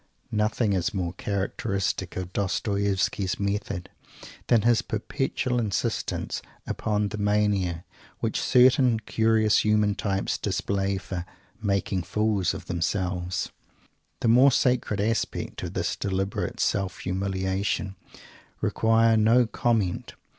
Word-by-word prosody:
Nothing 105 0 +1
is 95 +2 -1
more 90 -2 -2
characteristic 95 -1 -2
of 90 0 -5
Dostoievsky's 100 -1 0
method 100 -3 -2 0.6
than 115 -3 +4
his 120 -1 +4
perpetual 125 +3 -2
insistence 110 0 -2 0.2
upon 105 -1 -1
the 110 - -5
mania 105 -4 +1 0.3
which - - -1
certain 125 -2 +5
curious 110 -2 +3
human 105 -1 +3
types 100 -1 -1
display 100 0 -1
for 95 -2 -5 0.4
"making 100 -2 0
fools 100 +1 0
of - - -8
themselves." 90 0 -2 0.7
The 120 - +1
more 125 +4 +6
sacred 125 -5 +1
aspects 115 +3 -1
of - - -5
this - - -1
deliberate 95 0 -2
self 95 -2 0
humiliation 95 +1 -1 0.6
require 115 0 +3
no 115 +3 +5
comment. 110 -5 -1
100 Hz, 110 wpm, -26 LUFS, 95-110 Hz, 0.7 s, more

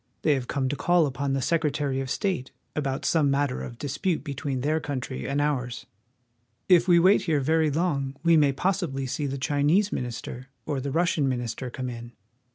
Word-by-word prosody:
They 155 - +4
have 130 -3 -2
come 135 -2 -1
to 140 - -1
call 175 +2 +3
upon 135 0 -2
the 135 -1 0
Sec 165 +3 +1
retary 145 -3 -1
of 135 - -5
State 175 -6 -1 0.3
about 135 -3 -2
some 155 -4 +3
matter 140 -1 0
of 120 - -7
dispute 155 +6 -2
between 140 -2 -3
their 155 +4 +1
36 150 - -10
WASHINGTON. - - 0
country 130 0 -4
and 140 +1 0
ours. 130 -5 -1 0.8
If 180 -1 +5
we 175 -2 +6
wait 185 +4 +5
here 160 -4 +2
very 160 +3 +2
long 140 -4 -1
we 170 -1 +5
may 145 -3 +5
possibly 165 -4 -1
see 145 +3 -2
the 135 0 -3
Chinese 150 +9 +2
minister 125 +1 -5 0.2
or 145 -3 -2
the 140 - -3
Russian 160 -2 +1
minister 125 0 -3
come 130 +1 -5
in. 120 -1 -7
140 Hz, 200 wpm, -26 LUFS, 130-160 Hz, 0.8 s, we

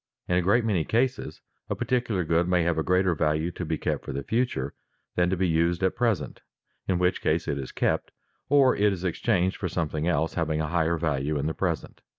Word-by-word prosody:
In 90 - +1
a 90 - +3
great 105 +6 +3
many 95 -7 +1
cases 125 +8 -1 0.3
a - - -1
particular 120 -7 0
good 85 +2 +1
may 90 -1 +2
have 85 -1 +1
a - - +2
greater 90 +2 +2
value 80 +2 0
to 90 - -6
be 80 -1 -2
kept - - -2
for - - -6
the 70 +1 -4
future 115 - -1 0.4
than 90 0 +2
to 95 - 0
be 95 +1 +1
used 85 +2 +1
at 95 - +2
present, 115 -4 -1 0.5
in 95 - +1
which 90 +1 +1
case 80 +2 0
it 70 -2 -1
is 65 - -6
kept, - - 0 0.4
or 140 -2 +5
it 105 0 +3
is 95 -2 -4
exchanged 95 +1 0
for 95 - -3
something 80 -2 -2
else 80 -2 +1
having 80 -2 -1
a 80 - 0
higher 85 0 +1
value 75 -2 -1
in 70 - -2
the 80 - -1
present. 85 -5 -3
85 Hz, 220 wpm, -26 LUFS, 80-95 Hz, 0.5 s, or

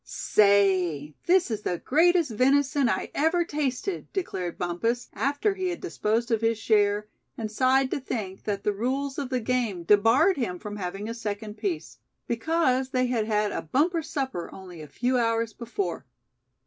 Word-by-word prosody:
"Say, 190 -8 +2
this 360 -6 +4
is 215 -1 -2
the 180 - -2
greatest 330 - +3
venison 275 +3 +3
I - - -2
ever 330 +4 +2
tasted!" 300 +4 -3
declared 190 - -3
Bumpus, 225 +8 -2
after 285 +9 0
he 375 -1 -2
had 350 - -4
disposed 235 - -1
of 225 -1 +2
his 225 0 +1
share, 210 -1 +2 0.3
and 220 -2 -4
sighed 260 +3 +2
to - - -1
think 210 -7 -5
that 200 -2 -2
the 210 - +1
rules 265 +6 -2
of 275 -3 -3
the 255 -1 0
game 230 -7 -1
debarred 230 - +4
him 215 -9 -2
from 210 +2 -7
having 195 +2 -4
a 230 - -3
second 210 -2 -5
piece; 365 -5 -4 0.3
because 260 0 +1
they 255 -1 +1
had 235 -3 0
had 210 -1 +1
a - - -3
bumper 325 - +1
supper 265 - -4
only 180 -4 -10
a 150 - -9
few 250 - 0
hours 230 -1 0
before. 205 - -4
235 Hz, 170 wpm, -26 LUFS, 205-275 Hz, 0.3 s, this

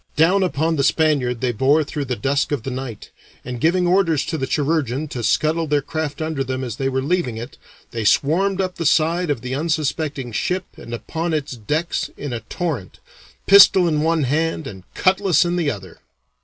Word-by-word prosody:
Down 175 +6 +4
upon 165 -3 0
the 140 - +1
Spaniard 135 -6 +1
they 125 -1 +1
bore 135 +7 +3
through 145 -1 -4
the 125 -1 -2
dusk 140 +4 0
of 140 -6 -1
the 135 - -4
night, 125 -4 -7 0.3
and 125 -2 -6
giving 175 +2 +2
orders 175 -4 +2
to 160 - -3
the 135 - -2
"chirurgeon" 145 -2 0
to 125 - -5
scuttle 155 +8 +1
their 145 -1 +1
craft 155 0 -3
under 155 -3 -2
them 130 0 -3
as 120 -4 -5
they 135 -1 0
were 130 0 -1
leaving 155 -7 -1
it, 120 +4 -7 0.4
they 115 -2 -3
swarmed 180 - +2
up 185 -1 -2
the 170 - -3
side 165 +3 +2
of 140 -6 -1
the 125 +1 -5
unsuspecting 150 -3 -2
ship 180 +10 -1
and 115 - -11
upon 165 +6 -3
its 150 -2 -3
decks 150 +9 -2
in 145 -3 -5
a 120 - -2
torrent 150 - -4 0.5
pistol 195 -2 +7
in 155 -2 +1
one 160 -1 +1
hand 160 +4 0
and 95 -7 -10
cutlass 185 -3 +3
in 175 0 0
the 170 -4 +1
other. 95 -8 -7
150 Hz, 195 wpm, -21 LUFS, 130-165 Hz, 0.5 s, pistol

